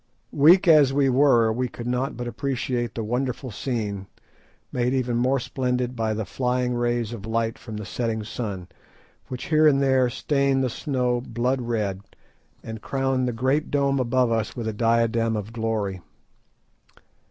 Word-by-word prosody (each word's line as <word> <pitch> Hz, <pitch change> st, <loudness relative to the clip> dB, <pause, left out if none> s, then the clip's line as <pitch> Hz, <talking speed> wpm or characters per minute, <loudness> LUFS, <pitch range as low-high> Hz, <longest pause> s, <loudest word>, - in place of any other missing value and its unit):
Weak 170 Hz, +6 st, +6 dB
as 150 Hz, -5 st, +6 dB
we 135 Hz, 0 st, +2 dB
were, 125 Hz, -4 st, +4 dB
we 125 Hz, +2 st, -1 dB
could 120 Hz, -1 st, -9 dB
not 125 Hz, +2 st, -1 dB
but 120 Hz, -1 st, -4 dB
appreciate 125 Hz, -2 st, -2 dB
the 115 Hz, -, -3 dB
wonderful 125 Hz, +2 st, -2 dB
scene, 105 Hz, -5 st, -3 dB, 0.6 s
made 125 Hz, +1 st, 0 dB
even 125 Hz, -2 st, 0 dB
more 130 Hz, +3 st, +2 dB
splendid 125 Hz, 0 st, -2 dB
by 110 Hz, -2 st, -1 dB
the 110 Hz, -1 st, -3 dB
flying 125 Hz, +1 st, -1 dB
rays 120 Hz, -1 st, -1 dB
of 110 Hz, -2 st, -7 dB
light 115 Hz, 0 st, -1 dB
from 110 Hz, -3 st, -8 dB
the 105 Hz, -, -6 dB
setting 115 Hz, -1 st, -2 dB
sun, 105 Hz, -5 st, -5 dB, 0.6 s
which 125 Hz, -1 st, -6 dB
here 155 Hz, 0 st, +6 dB
and 140 Hz, -2 st, +4 dB
there 130 Hz, -2 st, +3 dB
stained 140 Hz, +1 st, +1 dB
the 125 Hz, -, 0 dB
snow 125 Hz, -3 st, -1 dB
blood 125 Hz, +2 st, -1 dB
red, 105 Hz, -5 st, -2 dB, 0.6 s
and 110 Hz, -1 st, -7 dB
crowned 135 Hz, -1 st, 0 dB
the -, -, 0 dB
great 130 Hz, +6 st, 0 dB
dome 140 Hz, -1 st, +1 dB
above 125 Hz, -1 st, +2 dB
us 115 Hz, -2 st, -1 dB
with 115 Hz, -2 st, -4 dB
a 110 Hz, -, -2 dB
diadem 115 Hz, 0 st, +1 dB
of 105 Hz, +2 st, -6 dB
glory. 110 Hz, -5 st, -2 dB
120 Hz, 165 wpm, -24 LUFS, 115-130 Hz, 0.6 s, Weak